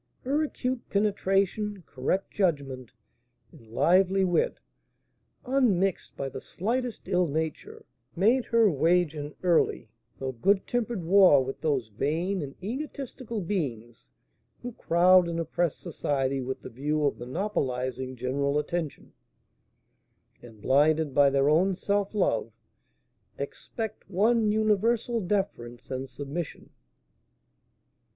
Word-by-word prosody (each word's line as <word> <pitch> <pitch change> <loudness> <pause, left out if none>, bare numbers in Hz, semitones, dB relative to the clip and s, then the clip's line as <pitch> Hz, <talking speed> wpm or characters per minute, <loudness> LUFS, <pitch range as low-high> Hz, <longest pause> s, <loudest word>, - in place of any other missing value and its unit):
Her 280 +4 +1
acute 255 -4 -3
penetration, 200 0 0
correct 140 +9 -2
judgment, 140 - -1 0.6
and 115 - -17
lively 190 - +3
wit, 175 -2 +1 0.9
unmixed 215 -9 +1
by 140 - -3
the 135 - -7
slightest 235 +3 -3
ill 180 -2 +2
nature, 160 +1 -4 0.3
made 230 +8 +3
her 230 -2 +4
wage 170 0 +2
an 145 -1 -6
early, 170 -9 +2 0.3
though 130 -1 -3
good 195 - +1
tempered 235 -5 -2
war 175 -6 +6
with 135 - -6
those 140 -8 0
vain 165 - -1
and 140 -2 -7
egotistical 255 -1 -5
beings 125 - -4 0.6
who 245 - -4
crowd 180 -3 +4
and 170 0 -2
oppress 165 0 -1
society 140 -5 -2
with 130 +1 -5
the - - -7
view 150 +5 -1
of 140 - 0
monopolising 130 - -3
general 140 +3 -1
attention, 160 0 -4 1.3
and, 115 -4 -14
blinded 150 +2 +3
by 140 0 +5
their 135 0 +2
own 180 +6 +3
self 200 +2 -1
love, 210 - +1 0.9
expect 220 -5 -6
one 215 +3 +2
universal 220 +2 +1
deference 155 - -3
and 130 0 -4
submission. 145 +3 -6
175 Hz, 115 wpm, -27 LUFS, 140-205 Hz, 1.3 s, war